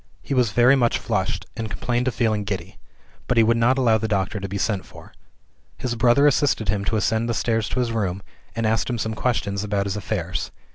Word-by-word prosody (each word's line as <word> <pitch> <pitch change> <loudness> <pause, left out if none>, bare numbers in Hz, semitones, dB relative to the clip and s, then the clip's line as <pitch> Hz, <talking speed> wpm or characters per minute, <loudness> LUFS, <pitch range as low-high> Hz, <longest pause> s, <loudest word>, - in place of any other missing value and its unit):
He - - -3
was 125 -3 +3
very 120 +3 +5
much 120 -3 +2
flushed, 105 -5 -2
and 110 -2 -4
complained 120 +5 -1
of 130 - -1
feeling 110 -3 +1
giddy; 95 -3 -5 0.5
but 125 - 0
he 115 - +7
would 115 +1 +3
not 120 +3 +3
allow 115 -4 +3
the 110 - -2
doctor 100 0 -1
to 100 0 -5
be 100 - -3
sent 100 -2 -1
for. - - -15 0.6
His 125 - -2
brother 120 +4 +4
assisted 140 - +2
him 100 +1 0
to 95 - 0
ascend 110 +2 0
the 115 - 0
stairs 115 -1 0
to - - -2
his 120 -2 0
room, 100 -4 -2 0.3
and 115 -1 -1
asked 110 +3 +1
him 120 - -1
some 110 0 -2
questions 105 -4 -1
about 100 -1 -1
his 100 0 -2
affairs. 90 -5 -3
110 Hz, 225 wpm, -23 LUFS, 100-120 Hz, 0.6 s, he